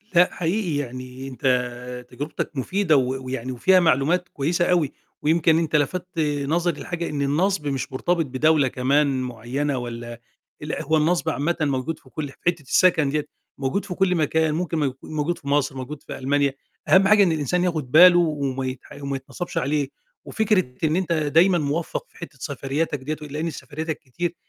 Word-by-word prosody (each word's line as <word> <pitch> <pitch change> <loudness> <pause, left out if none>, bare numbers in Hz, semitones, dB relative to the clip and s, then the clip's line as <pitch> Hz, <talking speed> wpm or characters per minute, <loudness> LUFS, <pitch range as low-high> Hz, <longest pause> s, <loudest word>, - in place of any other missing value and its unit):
لأ، 175 +1 +5
حقيقي 175 -1 -1
يعني 130 0 -6
أنت 125 -1 -2
تجربتك 150 +3 -4
مفيدة 175 +3 +2
و 130 0 -1
ويعني 130 -1 -4
وفيها 185 +10 +4
معلومات 170 +2 +2
كويسة 165 +5 0
أوي، 170 -6 +2 0.3
ويمكن 160 +1 +3
أنت 160 -2 -1
لفتت 175 +4 -1 0.3
نظري 170 +1 0
لحاجة 170 -1 -4
إن 145 -1 -3
النَصْب 150 +3 +1
مش 135 -2 -2
مرتبط 170 +5 0
بدولة 145 +2 +3
كمان 135 +1 +1
معيّنة، 125 +4 -2
والَّا 120 -1 -6 0.4
لأ - - -4
هو 160 +2 +2
النَصْب 160 +2 +1
عامةً 160 +3 0
موجود 140 +1 -1
في 130 - -20
كُلّ 145 0 -5
في - - -16
حتة 170 -2 +2
السكن 160 +1 +3
ديَّة 150 +1 -1 0.3
موجود 135 +9 -1
في 180 - -5
كُلّ 185 0 +2
مكان 160 0 +1
ممكن 165 0 -2
مو 140 -4 0
موجود 155 +3 -2
في 140 - -13
مصر 140 -1 +1
موجود 140 +3 -7
في - - -7
ألمانيا، 140 +1 +1 0.3
أهم 195 +1 +6
حاجة 210 0 +6
إن 180 - +3
الإنسان 160 +3 0
ياخد 155 -8 -2
باله 175 +2 +8
وما 140 -5 -1
يتح 130 +2 -6
وما 140 0 -2
يتنَصَبش 135 +7 -6
عليه، 145 +1 0 0.4
وفكرة 205 - +1
إن 155 0 +2
أنت 180 -2 0
دايمًا 165 +4 +4
موفّق 155 +2 -2
في - - -22
حتة 170 -4 -9
سفرياتك 140 +3 -2
دِيّة 150 +3 -5
لإن 155 +4 -3
سفرياتك 155 +2 -5
كتير، 170 +6 -4
150 Hz, 175 wpm, -23 LUFS, 135-170 Hz, 0.4 s, باله